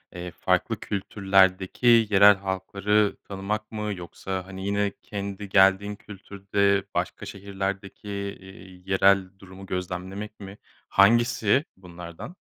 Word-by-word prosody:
eee, 90 0 -6
farklı - - 0
kültürlerdeki 95 +3 +2
yerel 100 0 +7
halkları 100 +2 0
tanımak 105 +2 -4
mı? 105 -1 -3
Yoksa, 95 +1 -6
hani, 95 0 -8
yine 100 0 0
kendi 100 -1 -6
geldiğin 95 +1 +4
kültürde 100 -1 -1
başka - - -3
şehirlerdeki, 100 +1 -5
eee, 95 -2 -8
yerel 95 0 +3
durumu 95 0 -12
gözlemlemek 95 +3 -5
mi? 100 0 -10 0.3
Hangisi 120 +5 +3
bunlardan? 90 - -10
100 Hz, 105 wpm, -25 LUFS, 95-105 Hz, 0.3 s, yerel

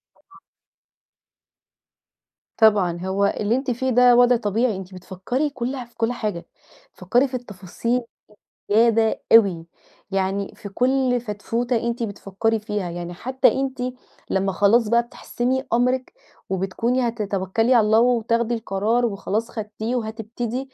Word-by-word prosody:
طبعًا. 390 0 -22 2.2
طبعًا، 200 -6 +4
هو 190 +2 0
اللي 215 +3 +1
أنتِ 265 0 -1
فيه 260 +2 -1
ده 250 0 +5
وضع 245 0 +5
طبيعي 225 +1 0
أنتِ 190 0 -9
بتفكري 190 - -3
كله 255 -1 -4
في 240 - -27
كُل 230 +1 0
حاجة، 210 -8 -4 0.5
تفكري 240 +9 +2
في 260 - -18
التفاصيل 235 +1 -3 0.7
زيادة 225 0 +3
أوي، 195 -7 +5 0.5
يعني 195 +1 -1
في 205 - -9
كُل 250 +3 +1
فتفوتة 235 +2 -2
أنتِ 235 0 -2
بتفكري 215 +1 -2
فيها، 210 -4 -3
يعني 175 0 -6
حتّى 260 +9 +1
أنتِ 265 -1 -3 0.5
لمّا 195 0 0
خلاص 210 +4 +3
بقى 235 +1 +4
بتحسمي 250 +2 -3
أمرِك 250 +2 +1 0.4
وبتكوني 225 +7 0
هتتوكلي 215 +1 0
على 225 -3 +5
الله 220 +1 +4
وتاخدي 235 -1 +1
القرار 225 +3 0
وخلاص 215 +1 -2
خدتيه 220 +2 -4
وهتبتدي 235 +3 -4
225 Hz, 125 wpm, -22 LUFS, 200-245 Hz, 2.2 s, ده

